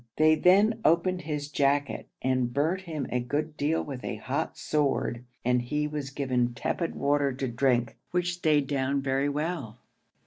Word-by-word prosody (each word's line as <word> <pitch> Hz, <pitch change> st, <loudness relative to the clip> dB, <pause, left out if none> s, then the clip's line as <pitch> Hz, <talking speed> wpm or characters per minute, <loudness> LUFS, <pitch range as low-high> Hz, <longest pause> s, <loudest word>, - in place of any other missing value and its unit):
They 155 Hz, 0 st, +5 dB
then 200 Hz, +7 st, +4 dB
opened 180 Hz, +2 st, +3 dB
his 150 Hz, -3 st, -3 dB
jacket 140 Hz, -1 st, 0 dB, 0.2 s
and 130 Hz, -2 st, +1 dB
burnt 160 Hz, +8 st, 0 dB
him 155 Hz, -5 st, -3 dB
a 125 Hz, -, +1 dB
good 150 Hz, +5 st, -2 dB
deal 155 Hz, +3 st, 0 dB
with 135 Hz, -4 st, -7 dB
a -, -, -3 dB
hot -, -, -3 dB
sword, 140 Hz, -5 st, 0 dB, 0.2 s
and 125 Hz, 0 st, +3 dB
he 150 Hz, +5 st, -1 dB
was 150 Hz, -2 st, -4 dB
given 125 Hz, -3 st, 0 dB
tepid 170 Hz, +7 st, -2 dB
water 140 Hz, 0 st, +2 dB
to 130 Hz, +1 st, -3 dB
drink, 120 Hz, -1 st, +1 dB
which 175 Hz, 0 st, 0 dB
stayed 155 Hz, -5 st, +2 dB
down 135 Hz, 0 st, 0 dB
very 135 Hz, +1 st, +1 dB
well. 145 Hz, -6 st, -3 dB
145 Hz, 165 wpm, -28 LUFS, 130-155 Hz, 0.2 s, They